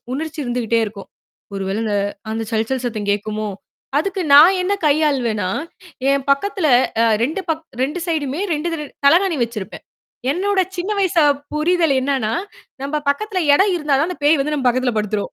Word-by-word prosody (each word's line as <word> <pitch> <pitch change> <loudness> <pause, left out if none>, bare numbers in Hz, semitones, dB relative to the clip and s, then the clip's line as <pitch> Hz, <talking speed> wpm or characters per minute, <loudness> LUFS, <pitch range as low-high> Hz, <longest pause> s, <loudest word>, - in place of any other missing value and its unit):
உணர்ச்சி 315 +2 -5
இருந்துக்கிட்டே 240 -2 0
இருக்கும். 205 -1 -9 0.5
"ஒரு 195 - -3
வேளை 200 +3 -2
அந்த 215 -2 -1 0.4
அந்த 225 0 -3
சல் 220 0 0
சல் 260 -1 -2
சத்தம் 215 -4 -4
கேட்குமோ." 215 +1 -3 0.5
அதுக்கு 385 +5 -2
நான் 340 +7 +8
என்ன 395 +3 0
கையாளுவேன்னா, 270 -10 +1 0.6
என் 275 -1 0
பக்கத்துல 355 +5 +1 0.4
அ - - +4 0.2
2 315 +8 -2
பக் 320 0 -2 0.2
2 295 +7 -1
சைடுமே 305 -2 -2
2 305 +3 -2 0.4
தலையனை 350 +3 +4
வச்சிருப்பேன். 215 -5 -8 0.5
என்னோட 380 +5 +1 0.2
சின்ன 360 +3 -3
வயசு 360 -4 +2 0.3
புரிதல் 325 0 +2
என்னன்னா, 260 -5 -1 0.5
"நம்ப 280 +2 -2
பக்கத்துல 390 +7 -1 0.2
இடம் 385 +5 +3
இருந்தா 300 -4 0
தான் 315 +5 +1
அந்த 360 - -6
பேய் 300 0 +5
வந்து 300 +2 -1
நம்ம 270 -4 -1
பக்கத்துல 250 0 +1
படுத்துரும். 210 -1 -2
285 Hz, 160 wpm, -19 LUFS, 230-335 Hz, 0.6 s, நான்